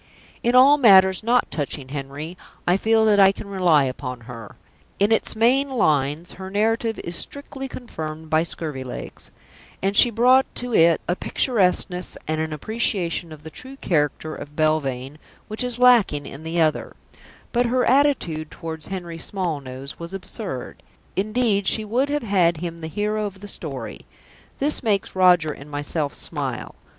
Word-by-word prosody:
In 240 Hz, +1 st, +1 dB
all 275 Hz, +3 st, +7 dB
matters 190 Hz, -6 st, +6 dB
not 240 Hz, +3 st, +2 dB
touching 140 Hz, -3 st, -4 dB
Henry, 145 Hz, +4 st, -6 dB, 0.3 s
I 175 Hz, -, +3 dB
feel 220 Hz, +2 st, +3 dB
that 210 Hz, -2 st, +4 dB
I 195 Hz, -1 st, +7 dB
can 200 Hz, -, -9 dB
rely 180 Hz, -7 st, +3 dB
upon 130 Hz, -1 st, -4 dB
her; 115 Hz, -2 st, -10 dB, 0.4 s
in 200 Hz, +2 st, +2 dB
its 225 Hz, -, +1 dB
main 255 Hz, +5 st, +3 dB
lines 155 Hz, -, +1 dB
her 190 Hz, 0 st, -8 dB
narrative 225 Hz, +3 st, 0 dB
is 170 Hz, -, -3 dB
strictly 270 Hz, +4 st, -5 dB
confirmed 160 Hz, -11 st, -7 dB
by 155 Hz, 0 st, +3 dB
Scurvilegs, 150 Hz, -6 st, -6 dB, 0.5 s
and 195 Hz, +1 st, -1 dB
she 240 Hz, -, +7 dB
brought 250 Hz, +4 st, +4 dB
to 245 Hz, -1 st, -4 dB
it 165 Hz, -4 st, +5 dB
a 175 Hz, -, +1 dB
picturesqueness 185 Hz, -6 st, 0 dB
and 155 Hz, 0 st, -1 dB
an 160 Hz, 0 st, -3 dB
appreciation 175 Hz, -1 st, -1 dB
of 155 Hz, -1 st, -11 dB
the 160 Hz, -, -9 dB
true 260 Hz, +9 st, -9 dB
character 155 Hz, -, -1 dB
of 145 Hz, -1 st, -9 dB
Belvane 145 Hz, -3 st, -1 dB, 0.3 s
which 215 Hz, +3 st, -3 dB
is 250 Hz, -1 st, -2 dB
lacking 235 Hz, -12 st, +4 dB
in 140 Hz, +3 st, -9 dB
the 165 Hz, +1 st, -2 dB
other; 155 Hz, -2 st, +1 dB, 0.6 s
but 245 Hz, 0 st, +2 dB
her 250 Hz, +1 st, +1 dB
attitude 245 Hz, -, +2 dB
towards 160 Hz, -2 st, -7 dB
Henry 175 Hz, -3 st, -6 dB
Smallnose 140 Hz, -8 st, -4 dB
was 170 Hz, +3 st, -6 dB
absurd. 185 Hz, -, -6 dB, 0.3 s
Indeed 210 Hz, -1 st, +1 dB
she 220 Hz, -, +1 dB
would 250 Hz, +7 st, 0 dB
have 295 Hz, -1 st, -1 dB
had 180 Hz, -6 st, +2 dB
him 170 Hz, 0 st, -6 dB
the 160 Hz, -, -4 dB
hero 210 Hz, +4 st, -1 dB
of 195 Hz, -1 st, -10 dB
the 205 Hz, -, -9 dB
story. 135 Hz, -, -6 dB, 0.5 s
This 290 Hz, +2 st, +1 dB
makes 205 Hz, -6 st, -1 dB
Roger 180 Hz, -4 st, +5 dB
and 145 Hz, 0 st, -10 dB
myself 145 Hz, 0 st, -3 dB
smile. -, -, -4 dB
180 Hz, 160 wpm, -23 LUFS, 155-225 Hz, 0.6 s, all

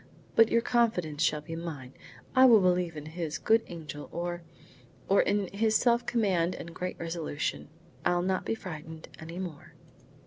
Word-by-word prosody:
"But 225 Hz, 0 st, +6 dB
your 230 Hz, -, +3 dB
confidence 185 Hz, -13 st, +1 dB
shall 150 Hz, -, +2 dB
be 165 Hz, +2 st, -7 dB
mine. 150 Hz, -6 st, -6 dB, 0.4 s
I 260 Hz, 0 st, +8 dB
will 235 Hz, -4 st, +8 dB
believe 180 Hz, -3 st, +1 dB
in 150 Hz, -, -7 dB
his 160 Hz, -1 st, -4 dB
good 225 Hz, +1 st, +3 dB
angel 155 Hz, -4 st, -8 dB
or 175 Hz, 0 st, -3 dB, 0.7 s
or 195 Hz, -, +5 dB
in 205 Hz, -1 st, +1 dB
his 220 Hz, +2 st, +2 dB
self 235 Hz, 0 st, +3 dB
command 185 Hz, -7 st, +1 dB
and 170 Hz, -, -8 dB
great 180 Hz, +2 st, -4 dB
resolution. 165 Hz, -4 st, -3 dB, 0.4 s
I'll 175 Hz, 0 st, +2 dB
not 185 Hz, 0 st, 0 dB
be -, -, -1 dB
frightened 160 Hz, -5 st, -8 dB
any 165 Hz, +2 st, -8 dB
more." 175 Hz, -6 st, -7 dB
175 Hz, 165 wpm, -29 LUFS, 160-205 Hz, 0.7 s, I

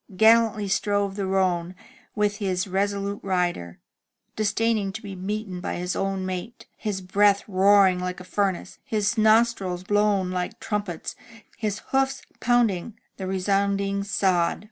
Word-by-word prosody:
Gallantly 220 Hz, -1 st, +4 dB
strove 200 Hz, 0 st, 0 dB
the 200 Hz, -2 st, -2 dB
roan 185 Hz, -2 st, 0 dB, 0.4 s
with 210 Hz, -1 st, +1 dB
his 190 Hz, -3 st, -1 dB
resolute 200 Hz, +1 st, -1 dB
rider, 175 Hz, -, -1 dB, 0.6 s
disdaining 215 Hz, -1 st, 0 dB
to 220 Hz, -, -6 dB
be 200 Hz, -2 st, -7 dB
beaten 190 Hz, 0 st, -4 dB
by -, -, -3 dB
his 180 Hz, +1 st, -3 dB
own 195 Hz, -1 st, -1 dB
mate, 185 Hz, +5 st, -6 dB
his 205 Hz, -3 st, -3 dB
breath 200 Hz, +2 st, +3 dB
roaring 195 Hz, -1 st, +4 dB
like 180 Hz, 0 st, -4 dB
a -, -, -9 dB
furnace, 195 Hz, -1 st, -2 dB
his 210 Hz, +1 st, 0 dB
nostrils 215 Hz, -5 st, +2 dB
blown 205 Hz, -2 st, +1 dB
like 180 Hz, -1 st, -3 dB
trumpets, 205 Hz, -5 st, -4 dB, 0.4 s
his 210 Hz, -2 st, -3 dB
hoofs 270 Hz, 0 st, 0 dB, 0.2 s
poimding 235 Hz, -4 st, +1 dB, 0.2 s
the 190 Hz, -, -5 dB
resounding 200 Hz, +1 st, 0 dB
sod. 185 Hz, -4 st, +1 dB
200 Hz, 135 wpm, -25 LUFS, 185-210 Hz, 0.6 s, Gallantly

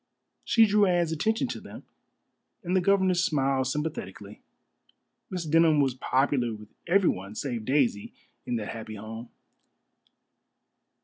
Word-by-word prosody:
She 225 Hz, -1 st, +5 dB
drew 205 Hz, -1 st, +3 dB
Anne's 175 Hz, -2 st, +1 dB
attention 220 Hz, -, 0 dB
to -, -, -5 dB
them, -, -, -11 dB, 0.8 s
and 180 Hz, +1 st, -1 dB
the 185 Hz, -, +3 dB
governess 185 Hz, -1 st, +2 dB
smiled 135 Hz, -5 st, +1 dB
sympathetically. 125 Hz, -9 st, -5 dB, 0.9 s
Miss 180 Hz, -3 st, -4 dB
Denham 160 Hz, 0 st, +4 dB
was 135 Hz, -3 st, +2 dB
popular 130 Hz, -2 st, 0 dB
with 105 Hz, 0 st, -13 dB, 0.2 s
everyone 165 Hz, -, +1 dB
save 120 Hz, -5 st, -4 dB
Daisy 130 Hz, -6 st, +1 dB, 0.4 s
in 120 Hz, -, -1 dB
that 110 Hz, -3 st, -4 dB
happy 110 Hz, -1 st, -7 dB
home. 110 Hz, +3 st, -8 dB
145 Hz, 125 wpm, -27 LUFS, 115-175 Hz, 0.9 s, She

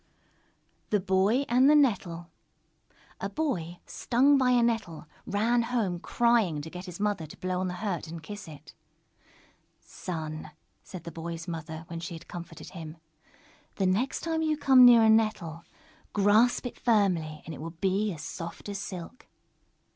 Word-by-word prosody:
_ -, -, -42 dB
THE 210 Hz, -, +2 dB
BOY 195 Hz, +8 st, +2 dB
AND 255 Hz, +3 st, +5 dB
THE 300 Hz, -, +6 dB
NETTLE 180 Hz, -, +1 dB, 0.9 s
A -, -, -3 dB
Boy, 180 Hz, -, -2 dB
stung 265 Hz, +4 st, +3 dB
by 260 Hz, -2 st, +3 dB
a 245 Hz, -1 st, +4 dB
Nettle, 225 Hz, -9 st, -1 dB, 0.2 s
ran 230 Hz, +4 st, +2 dB
home 230 Hz, -7 st, -1 dB
crying, 230 Hz, -8 st, +2 dB
to 160 Hz, -, -8 dB
get 180 Hz, +1 st, -7 dB
his 180 Hz, 0 st, -8 dB
mother 205 Hz, -6 st, -1 dB
to -, -, -12 dB
blow 185 Hz, 0 st, -2 dB
on 185 Hz, -, -1 dB
the 180 Hz, -, -4 dB
hurt 175 Hz, -5 st, -2 dB
and 165 Hz, 0 st, -8 dB
kiss 205 Hz, +2 st, -8 dB
it. 150 Hz, -3 st, -12 dB, 1.1 s
"Son," 155 Hz, -3 st, -6 dB, 0.3 s
said 185 Hz, -3 st, -10 dB
the 170 Hz, -, -7 dB
Boy's 165 Hz, +1 st, -6 dB
mother, 160 Hz, -1 st, -6 dB
when 165 Hz, -1 st, -6 dB
she 170 Hz, 0 st, -6 dB
had 165 Hz, -, -12 dB
comforted 170 Hz, -1 st, -9 dB
him, 165 Hz, -2 st, -8 dB, 0.8 s
"the 195 Hz, -, 0 dB
next 205 Hz, +9 st, 0 dB
time 325 Hz, -1 st, -1 dB
you 310 Hz, -1 st, +1 dB
come 265 Hz, -3 st, +7 dB
near 235 Hz, -2 st, +8 dB
a 220 Hz, -, +5 dB
Nettle, 200 Hz, -7 st, +1 dB, 0.5 s
grasp 215 Hz, +6 st, +3 dB
it 245 Hz, -, -6 dB
firmly, 180 Hz, -9 st, +1 dB
and 165 Hz, -, -6 dB
it 140 Hz, -, -8 dB
will 165 Hz, -, -5 dB
be 200 Hz, +2 st, +1 dB
as 160 Hz, -4 st, -7 dB
soft 170 Hz, +4 st, -7 dB
as 200 Hz, -1 st, -4 dB
silk." 185 Hz, +4 st, -8 dB
190 Hz, 170 wpm, -28 LUFS, 165-235 Hz, 1.1 s, near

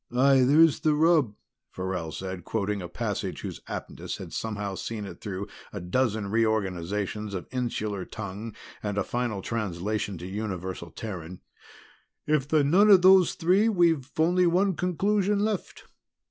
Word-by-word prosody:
"Aye, 135 Hz, +2 st, +4 dB
there's 150 Hz, +4 st, +5 dB
the 155 Hz, -1 st, +2 dB
rub," 155 Hz, -8 st, +3 dB, 0.3 s
Farrell 90 Hz, -3 st, -4 dB
said, 95 Hz, +1 st, -6 dB
quoting 105 Hz, -1 st, -2 dB
a 90 Hz, -, -6 dB
passage 85 Hz, -, -3 dB
whose -, -, -6 dB
aptness -, -, -6 dB
had -, -, -9 dB
somehow 105 Hz, -3 st, -3 dB
seen 105 Hz, +2 st, -5 dB
it 95 Hz, -, -10 dB
through 100 Hz, -1 st, -4 dB, 0.3 s
a 100 Hz, -, -5 dB
dozen 105 Hz, +2 st, -1 dB
reorganizations 105 Hz, -1 st, -1 dB
of 90 Hz, -, -4 dB
insular 110 Hz, -6 st, -2 dB
tongue 105 Hz, +5 st, -7 dB, 0.3 s
and 105 Hz, -1 st, -3 dB
a -, -, +2 dB
final 120 Hz, -5 st, -2 dB
translation 105 Hz, -2 st, -2 dB
to 85 Hz, -, -8 dB
universal 95 Hz, -3 st, -5 dB
Terran. 90 Hz, -2 st, -7 dB, 0.9 s
"If 150 Hz, -3 st, +1 dB
they're 155 Hz, -1 st, +3 dB
none 185 Hz, +9 st, +5 dB
of 190 Hz, -3 st, +7 dB
those 185 Hz, -2 st, +6 dB
three, 190 Hz, +7 st, +3 dB
we've 165 Hz, -, +2 dB
only 175 Hz, +3 st, +3 dB
one 185 Hz, +2 st, +2 dB
conclusion 200 Hz, +4 st, +1 dB
left. 210 Hz, -2 st, -2 dB
110 Hz, 145 wpm, -27 LUFS, 95-160 Hz, 0.9 s, of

